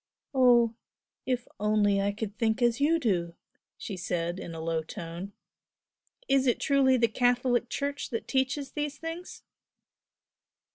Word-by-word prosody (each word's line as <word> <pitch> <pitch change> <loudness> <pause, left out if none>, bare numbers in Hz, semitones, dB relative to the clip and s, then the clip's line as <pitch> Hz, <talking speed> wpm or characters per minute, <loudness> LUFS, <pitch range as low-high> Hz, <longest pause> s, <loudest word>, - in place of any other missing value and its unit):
"Oh, 240 -3 +5 0.5
if 250 -1 +1
I - - -27
could - - -35
only 205 -1 +2 0.2
think 225 +1 +1
as 240 +1 +2
you 320 +3 +4
do!" 175 - 0 0.4
she 200 - -6
said, 175 0 -2
in 165 - -7
a - - -6
low 165 0 -1
tone 170 +4 -7 0.9
"Is 270 -1 +3
it 245 - +2
truly 270 -3 +3
the 230 -1 +4
Catholic 245 +1 +1
Church 285 +3 -3
that 230 - -4
teaches 265 +1 0
these 295 -1 -3
things?" 330 +3 -7
240 Hz, 140 wpm, -28 LUFS, 195-265 Hz, 0.9 s, Oh